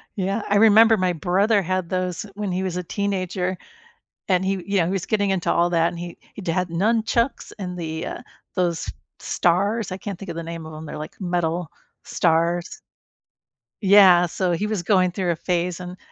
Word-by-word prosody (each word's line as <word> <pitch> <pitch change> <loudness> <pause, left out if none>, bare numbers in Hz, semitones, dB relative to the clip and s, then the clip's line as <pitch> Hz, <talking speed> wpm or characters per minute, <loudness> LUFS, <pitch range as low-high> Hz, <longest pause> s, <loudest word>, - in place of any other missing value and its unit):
Yeah, 195 +2 -1
I 205 - +4
remember 220 +1 +7
my 185 -1 +1
brother 195 +6 +2
had 185 -1 -2
those 185 -2 -2
when 205 -2 -3
he 185 +1 -1
was 185 -2 -3
a 180 - -3
teenager, 185 -1 -2 0.7
and 185 -1 +2
he 190 -1 -1
yeah, 195 -4 +2
he 180 - -1
was 195 -3 -2
getting 205 -3 +1
into 190 -3 +1
all 175 +1 +2
that, 165 -1 +3
and 175 - -7
he 175 0 -7 0.2
he'd 195 -4 -7
had 180 +2 0
nunchucks 225 +6 0
and 180 -2 -5
the, 160 0 -4
uh, - - -6 0.3
those 175 -3 -1 0.3
stars, 200 +4 0
I 185 - -4
can't 200 -2 -6
think 195 -2 -8
of 165 - -6
the 170 - -3
name 165 0 -6
of 160 - -9
'em, 155 +1 -8
they're - - -7
like 155 +6 -9
metal 175 -2 -1 0.3
stars. 170 +1 0 1.0
Yeah, 190 -3 +7
so 180 +2 -1
he 175 +5 -1
was 210 -5 -2
going 185 -2 +3
through 180 -1 -1
a - - -1
phase, 175 +1 -1
and 180 0 -8
180 Hz, 195 wpm, -23 LUFS, 170-200 Hz, 1.0 s, remember